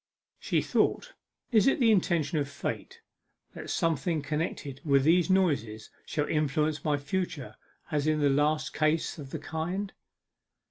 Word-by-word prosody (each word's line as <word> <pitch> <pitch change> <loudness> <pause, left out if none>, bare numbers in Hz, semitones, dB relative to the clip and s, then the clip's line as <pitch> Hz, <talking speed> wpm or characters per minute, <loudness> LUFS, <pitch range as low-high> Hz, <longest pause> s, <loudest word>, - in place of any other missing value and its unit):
She - - 0
thought, - - 0 0.4
'Is 220 -2 +4
it 270 - +3
the 235 -3 +5
intention 170 -5 +1
of 140 -1 -2
Fate 145 - -5 0.5
that - - -8
something 160 -1 0
connected 145 -3 -3
with 140 -3 +3
these 170 +4 +4
noises 140 - +1 0.2
shall 150 -1 -1
influence 150 0 0
my 150 -2 +1
future 145 -1 -4 0.4
as 150 -1 0
in 155 0 +2
the 145 -1 +3
last 145 -1 +1
case 155 +1 0
of 140 -2 -8
the - - -4
kind? 175 +6 -4
155 Hz, 145 wpm, -29 LUFS, 145-175 Hz, 0.5 s, the